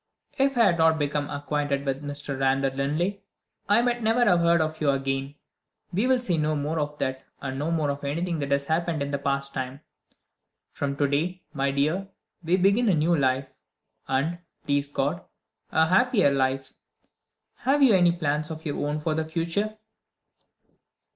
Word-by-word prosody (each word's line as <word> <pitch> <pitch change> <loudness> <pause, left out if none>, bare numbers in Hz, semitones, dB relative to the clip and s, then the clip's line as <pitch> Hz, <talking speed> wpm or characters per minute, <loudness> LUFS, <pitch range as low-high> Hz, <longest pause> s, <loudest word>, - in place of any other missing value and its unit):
If 275 -1 +2
I 235 - +6
had 175 -5 +3
not 160 0 +4
become 145 -1 -1
acquainted 145 -1 -2
with 135 0 -2
Mr. 145 -1 -5
Randal 135 0 +1
Linley, 165 +9 -1 0.5
I 215 +4 +5
might 240 -1 0
never 225 +2 +3
have 180 -6 +4
heard 170 0 +4
of 155 0 -2
you 150 - +2
again. 135 0 -1 0.6
We 205 +8 +1
will 260 0 +4
say 190 -10 -1
no 155 0 +1
more 150 +2 -2
of 150 0 -3
that, 130 -1 -3 0.2
and 135 -1 -5
no 150 +3 -1
more 155 -4 +1
of 140 0 -6
anything 165 +4 -2
that 140 -1 -3
has 140 0 +1
happened 160 -1 0
in 140 - -4
the 140 - -1
past 140 0 0
time. 130 +2 -5 0.9
From 140 -1 -3
to 145 0 +1
day, 165 +6 -1
my 140 -2 0
dear, 155 +8 0 0.4
we 170 +3 +2
begin 200 +5 +3
a 185 - +4
new 160 +3 +2
life, 135 -2 +1 0.6
and 145 +6 0 0.3
(please 140 0 0
God) 145 +4 -1 0.5
a 160 - +4
happier 200 - +3
life. 135 -1 0 0.9
Have 280 +2 +2
you 250 -5 +6
any 175 -2 +5
plans 150 -2 -1
of 160 0 -7
your 145 - -2
own 150 +1 -1
for 155 +1 -1
the 160 +1 0
future?" 170 +7 -2
150 Hz, 180 wpm, -26 LUFS, 140-175 Hz, 0.9 s, I